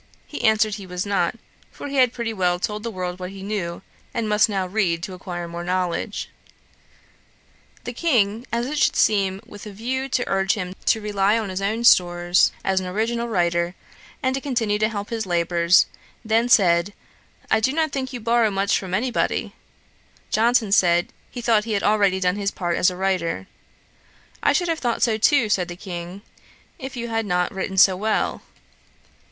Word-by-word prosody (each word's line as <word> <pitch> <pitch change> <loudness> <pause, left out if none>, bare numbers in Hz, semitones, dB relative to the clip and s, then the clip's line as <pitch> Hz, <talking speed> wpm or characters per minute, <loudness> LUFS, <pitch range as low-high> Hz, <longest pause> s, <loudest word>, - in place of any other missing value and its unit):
He - - -7
answered, 220 -1 +3
he 195 -2 -10
was 180 +1 -4
not, 200 -1 0 0.4
for - - -8
he 280 0 -4
had 255 -2 +5
pretty 235 -2 -4
well 180 -3 +1
told 210 +3 -3
the 230 - -4
world 180 -3 -5
what 180 0 -5
he 195 0 -10
knew, 195 -5 -4 0.3
and 230 -2 -1
must 210 +1 +3
now 195 -2 -1
read 180 -4 0
to 185 - -5
acquire 175 -1 -6
more 170 0 -6
knowledge. 180 +3 -2 1.6
The 245 - -5
King, 235 -6 +1
as 235 +1 0
it 295 +3 -3
should - - +3
seem 195 -2 +2
with 205 +1 -11
a - - -7
view 255 +6 -3
to 250 -1 -1
urge 195 0 +1
him 185 -3 -4
to 220 - +3
rely 205 0 +1
on 220 -3 -3
his 185 +1 -4
own 220 +4 -1
stores 175 -4 +4
as 190 0 +2
an 185 - -5
original 230 +5 -1
writer, 170 -3 0 0.5
and 260 0 +1
to 270 - -2
continue 230 -7 -1 0.3
his 225 -3 -4
labours, 170 0 +3 0.4
then 225 +2 +2
said 180 -3 +4 0.6
'I 220 - +4
do 225 +4 +1
not 315 0 0
think 260 -2 -3
you 250 - -5
borrow 230 0 +2
much 195 0 +1
from 185 -1 -3
any 250 +5 -1
body.' - - -1 0.8
Johnson 230 -1 +2
said, 175 -3 +3 0.2
he 245 - -7
thought 225 -3 +2
he 225 - -2
had 200 - 0
already 200 -3 +3
done 180 +1 +1
his 200 -1 0
part 175 -4 -2
as 180 - +3
a 180 - -7
writer. 190 -1 -1 1.0
'I - - +3
should 350 - +1
have 330 -1 -1
thought 240 -2 -1
so 220 -2 +2
too, 270 0 +4
(said 185 -4 +1
the 175 - -7
King,) 180 +1 -7 0.6
if 265 -2 -7
you 235 0 -3
had 225 -1 -1
not 180 -1 0
written 190 0 -4
so 190 0 +6
well.' 215 +3 -1
205 Hz, 190 wpm, -22 LUFS, 180-230 Hz, 1.6 s, so